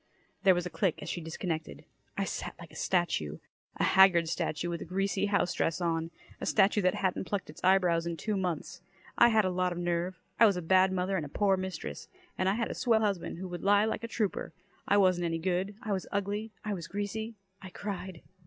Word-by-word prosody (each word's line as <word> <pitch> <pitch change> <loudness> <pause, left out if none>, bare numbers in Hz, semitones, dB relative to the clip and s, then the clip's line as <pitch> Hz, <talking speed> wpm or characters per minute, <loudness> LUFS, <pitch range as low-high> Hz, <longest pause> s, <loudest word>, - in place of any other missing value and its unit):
There 190 -2 +6
was 175 0 -1
a 180 - -5
click 165 +1 0
as - - -6
she 175 - -3
disconnected. 160 0 -4 0.3
I - - +1
sat - - -4
like - - -11
a - - -15
statue. 160 - 0 0.4
A - - -1
haggard 185 -3 +6
statue 155 +1 -2
with 170 -1 -3
a - - -5
greasy 195 +3 0
housedress 175 -4 +1
on. 165 -2 -1 0.3
A - - -4
statue 210 0 +4
that 185 -1 +2
hadn't 190 0 -1
plucked 195 -6 -3
its - - -15
eyebrows 180 -3 +3
in 170 -1 -3
two 210 +6 -2
months. 180 -1 -3 0.3
I 235 - +7
had 220 -3 +4
a 185 - +1
lot 180 0 0
of 175 - -4
nerve. 175 +1 -1 0.2
I 225 - +9
was 200 -3 +2
a - - -2
bad 185 +2 +4
mother, 190 +1 0
and 160 - -2
a - - -14
poor 195 +4 +2
mistress. 180 - -5 0.3
And 185 +1 +1
I 195 - +1
had 230 0 -1
a - - -2
swell 225 -3 +2
husband, 200 -6 -1
who 185 +2 -5
could 175 -1 -6
lie 205 +1 +5
like 220 0 -2
a - - -2
trooper. 220 -3 -2 0.3
I 205 - +4
wasn't 185 -3 +3
any 165 -1 0
good, 185 +4 -1
I 215 - -3
was 190 -2 -2
ugly, 205 +2 -2
I 210 - -1
was 170 -4 -5
greasy. 220 +3 -4 0.3
I 190 - -8
cried. 190 -3 -6
185 Hz, 225 wpm, -30 LUFS, 170-200 Hz, 0.4 s, I